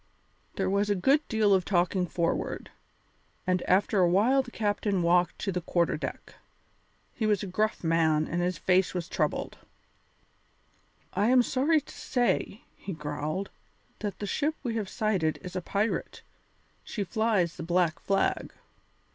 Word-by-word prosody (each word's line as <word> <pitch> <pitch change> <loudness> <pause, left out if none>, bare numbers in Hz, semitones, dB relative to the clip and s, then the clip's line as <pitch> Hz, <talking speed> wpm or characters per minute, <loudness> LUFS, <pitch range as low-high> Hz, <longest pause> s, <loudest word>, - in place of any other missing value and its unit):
There 190 - 0
was 200 +2 +1
a 205 - +3
good 270 +11 +3
deal 215 -3 +3
of 190 -1 +3
talking 180 0 +1
forward, 170 0 -2 0.7
and 185 -1 +1
after 195 +2 +3
a 180 -2 +5
while 230 +10 +4
the 260 - -10
captain 205 -4 0
walked 175 +1 +3
to 195 - -2
the 180 -1 -2
quarter 170 0 +1
deck. - - -6 0.8
He 220 - -1
was 210 -2 +1
a - - -2
gruff 210 +3 -1
man 160 -2 +2
and 175 +1 -1
his 180 -1 -1
face 185 +2 +2
was 175 -2 -2
troubled. 155 -6 -2 1.5
"I 200 +3 +2
am 250 0 +5
sorry 290 +6 +2
to 285 - -14
say," 245 -4 -1
he 195 - -7
growled, 150 +4 -4 0.5
"that 205 -2 -4
the 205 - -4
ship 300 +9 0
we 240 -4 -2
have 215 -4 -2
sighted 190 -8 0
is 180 -1 -8
a 185 - -1
pirate; 205 +5 -2 0.6
she 210 - -3
flies 200 -3 +1
the - - -6
black 170 -1 +1
flag." 195 0 0
190 Hz, 155 wpm, -28 LUFS, 175-215 Hz, 1.5 s, a